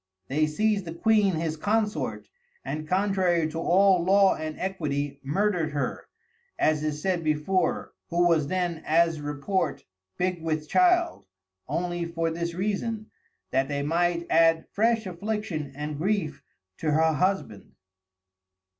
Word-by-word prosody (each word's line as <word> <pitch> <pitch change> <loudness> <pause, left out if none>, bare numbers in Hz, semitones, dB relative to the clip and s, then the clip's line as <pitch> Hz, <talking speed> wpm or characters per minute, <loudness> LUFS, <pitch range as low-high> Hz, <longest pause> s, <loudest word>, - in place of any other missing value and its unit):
They 155 +3 +2
seized 205 +5 0
the 165 0 -6
Queen 210 -1 +3
his 160 0 -2
Consort, 210 +5 -1 0.4
and 155 +1 -4
contrary 185 -3 +2
to 165 - -4
all 185 +1 +4
Law 195 +1 +5
and 155 0 -5
Equity 145 -7 -2
murdered 160 +2 0
her, 145 - -3 0.5
as 155 -1 +2
is 150 -1 -2
said 180 0 -1
before, 160 +4 0 0.2
who 175 +1 +3
was 160 -4 +2
then, 175 -2 -1
as 165 -1 +2
report, 150 +4 -2 0.3
big 180 -1 -1
with 155 -1 -2
Child, 350 - +2 0.4
only 175 0 -2
for 165 -1 -2
this 170 +1 -3
Reason, 215 +3 -2 0.4
that 135 +1 +1
they 140 0 -2
might 170 +2 +1
add 165 0 +4
fresh 225 +1 +2
Affliction 185 -5 -4
and 150 0 -5
Grief 170 -6 -1 0.4
to 155 - -1
her 160 +1 +3
Husband. 185 - -1
170 Hz, 135 wpm, -26 LUFS, 155-195 Hz, 0.5 s, Law